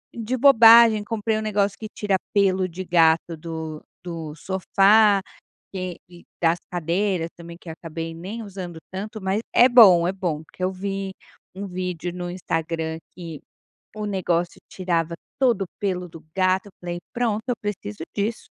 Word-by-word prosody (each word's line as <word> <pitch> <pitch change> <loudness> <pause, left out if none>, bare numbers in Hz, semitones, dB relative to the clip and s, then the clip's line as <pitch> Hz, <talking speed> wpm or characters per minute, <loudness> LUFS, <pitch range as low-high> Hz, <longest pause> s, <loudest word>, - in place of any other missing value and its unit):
de 235 +2 -2
bobagem. 230 -4 +7
Comprei 220 0 -1
um - - -2
negócio 205 -2 0
que 215 - -6
tira 200 -2 0 0.2
pelo 190 -2 +3
de 185 +3 -6
gato 165 -1 +3
do 160 -1 -6 0.2
do 165 -3 -6
sofá, 195 +3 +4 0.5
que 185 -2 -4
e 175 0 -15 0.2
das 165 +1 +3
cadeiras 175 +1 0
também 170 0 -10
que 165 - -10
acabei 165 0 -6
nem 200 +8 -6
usando 185 -5 -7
tanto, 215 +3 -6
mas 190 +3 0
é 245 - +7
bom, 195 -9 +7
é - - 0
bom. 175 -5 -3
Porque 185 - -12
eu 185 - 0
vi 195 0 -4 0.4
um 200 +1 -5
vídeo 180 -1 -4
no 175 0 -5
Instagram 165 -2 -3 0.2
que 165 -4 -8 0.6
o 210 0 -4
negócio 175 -3 -1
tirava 170 -3 -1 0.2
todo 235 -7 +3
o - - -5
pelo 180 -3 -2
do 160 - -13
gato, 185 +1 +2
eu - - -14
falei: 175 0 -4
"Pronto, 225 -3 0
eu 245 - +1
preciso 180 - -5 0.2
disso 215 +3 -2
185 Hz, 160 wpm, -23 LUFS, 170-205 Hz, 0.6 s, bobagem